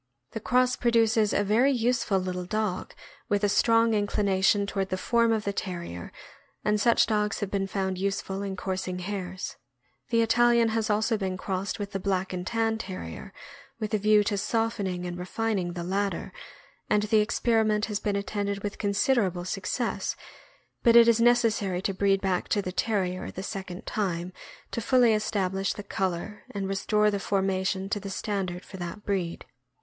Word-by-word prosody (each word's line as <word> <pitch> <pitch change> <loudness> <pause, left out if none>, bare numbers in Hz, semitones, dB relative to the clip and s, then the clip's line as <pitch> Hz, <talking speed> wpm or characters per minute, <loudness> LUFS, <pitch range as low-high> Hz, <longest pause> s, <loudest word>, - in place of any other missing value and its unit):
The - - -4
cross 250 +3 +2
produces 225 -2 +3
a 205 - +2
very 230 +7 +3
useful 235 -4 +1
little 180 -1 -3
dog, 215 -1 -2 0.3
with 205 -1 +1
a - - +5
strong 230 +2 +4
inclination 200 -1 +2
toward 195 -1 -2
the 185 - -1
form 230 +4 +2
of 220 -2 +1
the 200 - -2
Terrier, 170 - -5 0.5
and 210 0 +2
such 235 +2 +5
dogs 210 -2 0
have 205 - -3
been 195 -1 0
found 190 -1 -2
useful 195 0 -2
in 195 -1 -3
coursing 185 -1 -3
hares. 185 -1 -5 0.5
The 230 0 +3
Italian 235 0 +4
has 220 0 -1
also 215 +2 +2
been 190 -2 -2
crossed 190 +1 -3
with 205 -2 -5
the 195 - -3
Black 190 -1 -1
and 180 0 -4
Tan 225 -1 0
Terrier, 185 - -7 0.5
with 215 -1 -3
a 215 - +2
view 210 +1 +5
to 205 -1 -1
softening 205 -5 -1
and 175 0 -5
refining 190 -1 -2
the 175 -1 -4
latter, 195 +3 -2 0.6
and 210 0 +3
the 215 +1 +3
experiment 215 -1 +2
has 210 -2 -3
been 205 -1 -1
attended 200 0 -2
with 205 -1 -4
considerable 200 -4 +1
suc - - -4
cess, - - -1 0.7
but 235 -2 +5
it 235 0 +9
is 230 0 +4
necessary 225 -6 +3
to 195 - 0
breed 195 0 +2
back 185 -2 0
to 205 - +1
the 185 - -3
Terrier 185 -3 -1
the 190 - -7
second 190 -3 -6
time 180 -3 -2 0.4
to 230 - -2
fully 245 -1 +4
establish 195 -3 0
the 205 - -7
color 190 +1 -3
and 200 -2 -3
restore 210 +2 +2
the 200 - -1
formation 190 -1 0
to 205 - -1
the 200 0 -7
standard 190 -3 -3
for 190 - -10
that 175 +3 -6
breed. 185 -4 -2
200 Hz, 175 wpm, -27 LUFS, 190-220 Hz, 0.7 s, it